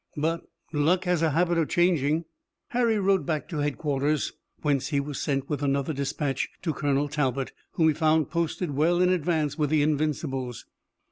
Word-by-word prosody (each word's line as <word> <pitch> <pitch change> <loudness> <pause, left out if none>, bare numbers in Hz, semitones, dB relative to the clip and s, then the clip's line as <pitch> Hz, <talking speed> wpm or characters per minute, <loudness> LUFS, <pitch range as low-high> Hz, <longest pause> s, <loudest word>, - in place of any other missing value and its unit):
"But 165 +3 0 0.3
luck 160 +5 +2
has 180 -3 +1
a 165 - +3
habit 170 +3 +2
of 160 - 0
changing." 165 -2 +2 0.4
Harry 235 -2 +2
rode 195 -1 +2
back 155 -3 -2
to 160 -5 -3
headquarters, 145 0 0 0.3
whence 145 -3 +1
he 145 -3 +1
was 140 -1 -4
sent 135 -2 -1
with 150 -2 -2
another 140 +1 0
dispatch, 140 -1 -2
to 165 -4 0
Colonel 145 0 0
Talbot, 135 -3 -1 0.2
whom 160 -2 +3
he - - +3
found 155 -1 +2
posted 170 0 -1
well 160 +5 +2
in 180 0 +4
advance 160 -4 0
with 150 -2 +2
the 155 -1 +3
Invincibles. 145 -4 -1
150 Hz, 175 wpm, -27 LUFS, 140-170 Hz, 0.4 s, in